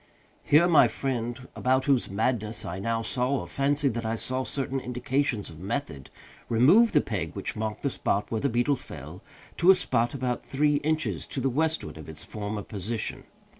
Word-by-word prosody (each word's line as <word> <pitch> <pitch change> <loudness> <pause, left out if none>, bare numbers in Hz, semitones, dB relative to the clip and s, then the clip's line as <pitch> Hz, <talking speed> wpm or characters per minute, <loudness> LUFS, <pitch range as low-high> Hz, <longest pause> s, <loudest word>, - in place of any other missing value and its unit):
Here 155 +4 +5
my 160 -8 +6
friend, 120 +1 -3
about 130 +1 +1
whose 135 -4 +2
madness 110 +1 -1
I 90 +2 -4
now 115 +3 -1
saw, 130 +3 0
or - - -8
fancied 140 -1 +1
that 115 +1 -3
I 110 0 -1
saw, 130 +3 -2
certain 135 +2 -1
indications 125 -3 -1
of 80 - -12
method, 95 - -4 0.4
removed 160 - +5
the - - +6
peg - - -3
which - - -4
marked 110 0 -4
the 140 - +1
spot 100 -3 -1
where 110 -2 -1
the 140 - +1
beetle 120 +4 +1
fell, - - -10 0.4
to 175 - +4
a 190 - +10
spot 125 -8 +1
about 125 -2 -2
three 145 +1 +2
inches 155 +1 -1
to - - -4
the 135 +1 0
westward 160 - -1
of 80 - -10
its 80 - -5
former 105 -1 -5
position. 110 +2 -4
125 Hz, 185 wpm, -27 LUFS, 110-140 Hz, 0.4 s, a